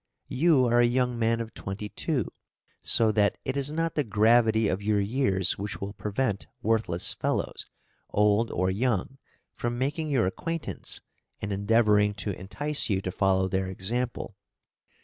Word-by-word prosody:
You 145 -2 +4
are 120 0 +3
a 120 - +5
young 125 -1 0
man 115 0 +1
of 115 -1 -6
twenty 100 +2 -6
two, - - -2 0.5
so 110 -2 +3
that 105 -2 +2
it 130 - -2
is 140 +1 +1
not 165 +1 -1
the 150 - +1
gravity 110 0 +3
of 95 0 -1
your 105 0 +1
years 100 -5 +1
which 100 +1 -4
will 100 +1 -5
prevent 105 0 -2 0.2
worthless 110 -6 +1
fellows, - - -2 0.4
old 105 +2 +2
or 95 +1 0
young, 120 +4 -1 0.3
from 120 0 -3
making 150 +5 -1
your 130 -7 +2
acquaintance 165 - -4 0.4
and 100 0 -3
endeavouring 105 0 +3
to 100 0 -1
entice 145 +12 +1
you 95 -2 +1
to 95 -1 -4
follow 95 0 +1
their 95 0 -1
example. 110 +4 -3
110 Hz, 155 wpm, -27 LUFS, 100-125 Hz, 0.5 s, a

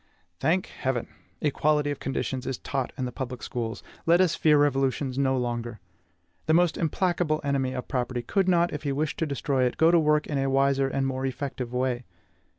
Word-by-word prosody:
Thank 170 +6 +2
Heaven! 130 -3 -3 0.3
equality 150 0 +2
of 145 - -5
conditions 135 -1 -3
is 130 - -2
taught 135 -3 -3
in 130 - -1
the 125 - -4
public 125 0 -6
schools; 115 -6 -4 0.2
let 170 +1 +6
us 180 -3 +4
fear 155 -3 +4
revolutions 135 -2 +1
no 135 -1 +2
longer. 120 -2 -3 0.7
The 160 - +4
most 175 -1 +3
implacable 165 -1 0
enemy 135 -2 0
of 125 -1 -5
property 125 -1 -2
could 190 - +1
not, 175 -1 +3
if 150 - -4
he 145 - -2
wished 150 +2 -2
to 165 - 0
destroy 140 -2 0
it, 125 - -1
go 160 +2 +5
to 170 - +5
work 150 -1 +3
in 145 -2 -2
a 135 0 +1
wiser 135 0 +3
and 135 0 -1
more 135 0 -1
effective 130 -2 -4
way. 125 -1 -1
135 Hz, 195 wpm, -27 LUFS, 130-155 Hz, 0.7 s, let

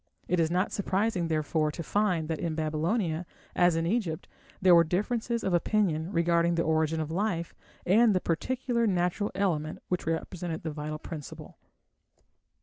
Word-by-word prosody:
It 180 - +1
is 160 -1 +2
not 180 +3 0
surprising, 195 -2 0
therefore, 155 -1 0
to 165 - -5
find 185 -5 0
that 160 -1 -2
in 165 -2 -2
Babylonia, 160 +3 -1 0.3
as 175 -2 +4
in 165 0 0
Egypt, 180 -5 -1 0.3
there 185 -1 +6
were 170 -1 +7
differences 225 +7 -1
of 190 - 0
opinion 175 -2 +1
regarding 170 -1 +2
the 170 - +1
origin 160 0 +1
of 155 0 -3
life 175 -2 -1 0.3
and 215 +3 +5
the - - +3
particular 235 +7 -1
natural 180 +2 0
element 160 -6 -1
which 180 -3 -2
represented 165 0 -3
the 160 - -3
vital 150 0 -5
principle. 155 -2 -9
170 Hz, 155 wpm, -28 LUFS, 160-195 Hz, 0.3 s, were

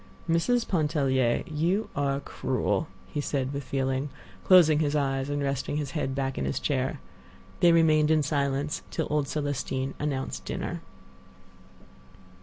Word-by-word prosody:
"Mrs. 225 +9 +2
Pontellier, 140 -7 +1
you 175 +6 -1
are 140 -1 0
cruel," 130 +4 -1 0.2
he 150 - -4
said, 135 -2 -2
with 140 0 -3
feeling, 135 +1 -1 0.3
closing 165 -5 +6
his 150 -1 +1
eyes 135 -1 0
and 145 0 -1
resting 140 +1 -1
his 145 -3 -3
head 135 -4 -2
back 135 -1 -2
in - - -1
his - - -1
chair. 130 -3 -1 0.6
They 175 - +6
remained 155 -2 +4
in 155 -1 +4
silence 140 0 -1
till - - -2
old 150 -2 +1
Celestine 140 -2 -2
announced 140 -3 -3
dinner. - - -4
145 Hz, 140 wpm, -27 LUFS, 135-155 Hz, 0.6 s, closing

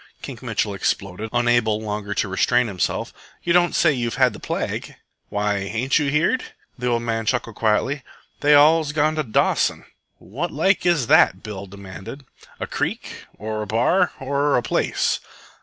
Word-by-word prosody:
Kink - - -8
Mitchell 105 - -1
exploded, 100 +2 -2
unable 120 -3 +2
longer 105 -1 -4
to - - 0
restrain 120 +6 +2
himself. 95 -6 -2 0.3
"You 170 - +1
don't 175 0 +3
say 155 -3 +4
you've 120 -3 -2
had - - +3
the - - -10
plague?" - - -4 0.3
"Why, 105 0 0
ain't 115 +9 0
you 145 -2 0
heerd?" 165 - +1 0.3
The 125 0 -4
old 120 -1 +1
man 115 -1 -2
chuckled 115 -3 -1
quietly. 115 +6 +1 0.4
"They 145 0 +5
all's 150 +1 +5
gone 155 +1 +2
to 155 - -1
Dawson." 110 -5 +1 0.3
"What 145 - -5
like 180 +5 +1
is 165 -8 +3
that?" 120 -8 +4
Bill 100 -2 -7
demanded. 100 +7 -10 0.3
"A - - -2
creek? - - -4
or 110 0 -4
a 105 - -5
bar? 125 - +2
or 140 +1 +1
a 120 - 0
place?" - - 0
120 Hz, 165 wpm, -22 LUFS, 105-145 Hz, 0.4 s, They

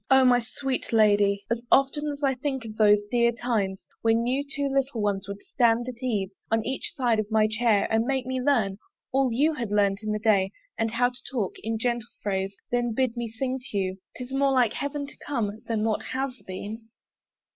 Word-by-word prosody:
O 265 0 +6
my 245 -1 +6
sweet 260 +3 -4
lady, 205 -2 +4
As 235 0 0
often 275 +2 +3
as 290 0 -4
I 270 -1 +3
think 265 -1 -3
of 215 -1 -7
those 210 -1 +5
dear 235 -1 +4
times 220 -5 -2 0.2
When 230 +1 +2
you 260 +3 0
two 280 0 -2
little 270 -3 0
ones 200 -2 -1
would 200 0 -7
stand 235 0 +2
at 245 -1 -7
eve 210 -7 -1 0.2
On 225 0 +1
each 265 +7 -3
side 240 -6 +2
of 215 -1 -2
my 220 -1 +4
chair, 215 -1 +2
and 225 0 +3
make 265 -1 0
me 260 0 -2
learn 220 -8 +1 0.3
All 270 -1 +2
you 295 +7 +2
had 235 -7 -4
learnt 200 -1 +2
in 215 -1 -2
the 210 - 0
day; 205 -3 +2 0.2
and 225 - 0
how 245 +2 +2
to 250 +1 -14
talk 220 -8 -1
In 225 +1 -2
gentle 240 0 -1
phrase, 195 -1 -1 0.2
then 240 -2 0
bid 255 -2 +1
me 235 -1 -3
sing 255 +4 -2
to 205 - -3
you 190 -1 -1 0.2
'Tis 250 +1 -7
more 275 0 +3
like 245 -4 +3
heaven 285 +2 -3
to 280 - -13
come 220 -6 -3
than 225 -2 0
what 220 -1 +1
has 260 -1 -4
been. 215 +4 -7
235 Hz, 210 wpm, -26 LUFS, 215-260 Hz, 0.3 s, O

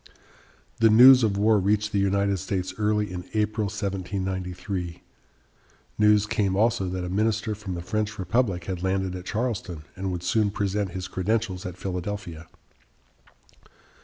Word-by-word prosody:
The 115 0 +6
news 125 +4 +9
of 100 -3 +1
war 105 +1 +4
reached 105 +2 +1
the 100 - +1
United 100 0 +1
States 95 +1 -3
early 105 -2 0
in 90 0 -7
April, 110 0 0
1793. 95 -2 -4 1.0
News 105 -1 +5
came 100 -2 0
also 110 -2 +1
that 90 0 -3
a - - -3
minister 105 +3 0
from 100 -3 -6
the 85 - -6
French 105 +2 -2
Republic 95 -1 0
had 90 -1 -4
landed 95 0 -1
at 90 0 -7
Charleston 105 -9 -3
and 95 0 -3
would 90 -1 -4
soon 105 +3 +2
present 100 -2 -2
his 95 -1 -4
credentials 95 0 -2
at 90 0 -8
Philadelphia. 90 -3 -5
100 Hz, 145 wpm, -25 LUFS, 90-105 Hz, 1.0 s, news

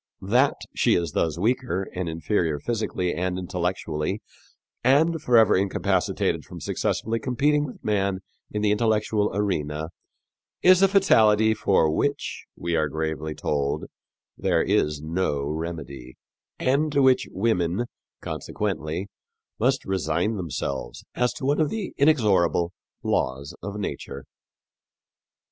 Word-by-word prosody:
That 125 +8 +3 0.2
she - - +3
is 85 -3 0
thus 80 +1 0
weaker 110 -2 0
and 90 -2 -3
inferior 80 -1 0
physically 105 -1 -2
and 90 +2 -2
intellectually 90 0 -2 0.6
and 155 +6 +3
forever 115 -6 +5
incapacitated 95 0 0
from - - -10
successfully 115 +1 -1
competing 145 +5 +1
with 125 - -11
man 100 -3 0 0.3
in 105 0 -3
the 105 - +3
intellectual 105 -1 +1
arena 80 -6 -1 0.7
is 185 0 +7
a 195 - +7
fatality 110 - +4
for 95 -7 +2
which, 140 - -2
we 85 0 -2
are 75 -2 +1
gravely 80 0 -3
told, 70 -1 -1 0.5
there - - +1
is 75 0 +1
no 80 -3 -1
remedy, 75 -5 -5 0.4
and 140 +4 +1
to 140 -1 +4
which 130 -1 +4
women, 95 0 0 0.4
consequently, 95 -3 -3 0.5
must 130 +3 +1
resign 95 +2 0
themselves 70 -8 -4
as 125 0 +1
to 140 - -6
one 145 +3 +2
of 150 - +2
the 215 -4 -4
inexorable 100 - +3 0.3
laws 65 +3 -1
of 100 +2 -5
nature." 70 -8 -5
95 Hz, 120 wpm, -25 LUFS, 80-120 Hz, 0.7 s, is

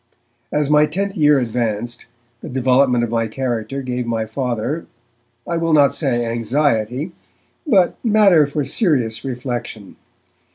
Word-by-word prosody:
As 150 -1 +1
my 150 +1 +4
tenth 195 +6 -3
year 150 -4 +4
advanced, 120 -2 -3 0.3
the - - -8
development 125 -1 +2
of 115 - -2
my 115 -1 0
character 125 +2 -3
gave 125 -1 -3
my 115 -1 -1
Father, 125 +5 -3 0.6
I 170 - -2
will 165 -1 0
not 145 -2 +5
say 120 -6 0
anxiety, 120 - -1 0.6
but 195 -9 +2
matter 205 - +5
for 145 +1 -2
serious 135 - 0
reflection. 120 -5 -5
130 Hz, 130 wpm, -19 LUFS, 120-150 Hz, 0.6 s, not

